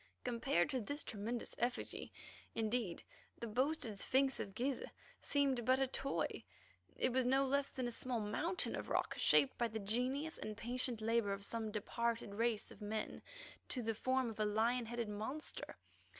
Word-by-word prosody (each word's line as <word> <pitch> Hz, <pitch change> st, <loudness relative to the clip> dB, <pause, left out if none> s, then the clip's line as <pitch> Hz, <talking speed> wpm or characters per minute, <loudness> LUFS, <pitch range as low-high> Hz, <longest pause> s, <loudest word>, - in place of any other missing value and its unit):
Compared 235 Hz, -7 st, +2 dB
to 260 Hz, -, 0 dB
this 285 Hz, +8 st, -2 dB
tremendous 225 Hz, +2 st, -3 dB
effigy 245 Hz, +1 st, -1 dB, 0.4 s
indeed, 220 Hz, -5 st, 0 dB, 0.3 s
the -, -, -4 dB
boasted 240 Hz, -2 st, 0 dB
Sphinx 265 Hz, +4 st, +3 dB
of 195 Hz, -2 st, -4 dB
Gizeh 260 Hz, +2 st, -1 dB, 0.3 s
seemed 275 Hz, -4 st, +2 dB
but 255 Hz, +3 st, +5 dB
a 270 Hz, -, +4 dB
toy. 270 Hz, +1 st, -1 dB, 0.5 s
It 255 Hz, -, +2 dB
was 260 Hz, 0 st, +4 dB
no 265 Hz, +2 st, +4 dB
less 280 Hz, +1 st, +2 dB
than 255 Hz, -2 st, -2 dB
a -, -, -2 dB
small 245 Hz, 0 st, -2 dB
mountain 315 Hz, -, +1 dB
of -, -, -5 dB
rock -, -, +1 dB
shaped 270 Hz, -, +5 dB
by 235 Hz, -, +3 dB
the 220 Hz, -1 st, -4 dB
genius 250 Hz, +9 st, -1 dB
and 215 Hz, -1 st, -4 dB
patient 245 Hz, -1 st, -1 dB
labour 225 Hz, -2 st, +2 dB
of 200 Hz, 0 st, -4 dB
some 225 Hz, 0 st, -2 dB
departed 230 Hz, +1 st, -1 dB
race 225 Hz, 0 st, +1 dB
of -, -, -13 dB
men 215 Hz, +1 st, -3 dB, 0.5 s
to 250 Hz, -, -1 dB
the 225 Hz, 0 st, +1 dB
form 255 Hz, +1 st, +1 dB
of 220 Hz, -, -11 dB
a 215 Hz, -, +3 dB
lion 225 Hz, +3 st, +2 dB
headed 235 Hz, -1 st, -2 dB
monster. 220 Hz, +9 st, -4 dB
235 Hz, 170 wpm, -38 LUFS, 220-260 Hz, 0.5 s, but